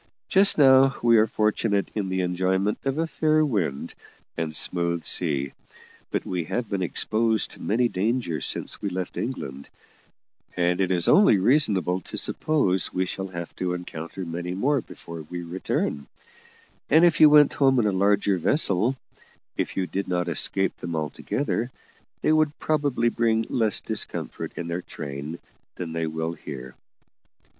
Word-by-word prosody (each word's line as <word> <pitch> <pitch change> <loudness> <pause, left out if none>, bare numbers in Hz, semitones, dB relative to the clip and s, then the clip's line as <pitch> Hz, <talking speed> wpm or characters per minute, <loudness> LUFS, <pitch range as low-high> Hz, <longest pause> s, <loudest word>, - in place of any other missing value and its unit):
Just 195 -1 +4
now 135 -1 +6
we 115 -1 +5
are 110 - +4
fortunate 105 -1 0
in 100 -3 -2
the 95 0 -1
enjoyment 95 +3 0
of 135 +1 -1
a 165 - +1
fair 155 -1 +2
wind 90 - -2 0.4
and 80 -2 -3
smooth 85 -1 +1
sea, 70 -6 0 0.6
but - - -2
we 90 -3 -3
have 120 +7 -3
been 100 -2 -2
exposed 110 +4 0
to - - -12
many 120 +4 +1
dangers 110 -5 -1
since - - -3
we 100 - -2
left 95 -1 -5
England, 70 - -5 0.9
and 90 +1 +1
it 95 - +1
is 90 -2 +1
only 195 - +6
reasonable 95 - +2
to - - -7
suppose 100 - +1
we 95 +1 0
shall 95 +1 -5
have 85 -2 -7
to 90 -1 -1
encounter 90 +1 -7
many 85 +2 -4
more 135 +7 +1
before 85 -5 -10
we 90 0 -5
return; 85 -4 -3 0.8
and 160 +4 +6
if 170 -3 +3
you 155 - +10
went 150 -1 +6
home 135 -2 +3
in 120 - +3
a 105 - +2
larger 100 0 +2
vessel, 115 - +2 0.6
if - - -3
you 95 - +1
did 95 +2 -4
not 90 -1 -1
escape 95 +4 +1
them 85 -1 -5
altogether, 115 - -2 0.5
they 155 - +3
would 155 -1 +2
probably 145 -6 +1
bring 115 -1 +1
less 110 -4 +2
discomfort - - -3
in 85 - -5
their 85 +2 -3
train 70 +1 -7 0.4
than 85 -2 -6
they 80 -1 -2
will 80 +1 -3
here." 65 -5 -9
95 Hz, 160 wpm, -25 LUFS, 85-120 Hz, 0.9 s, you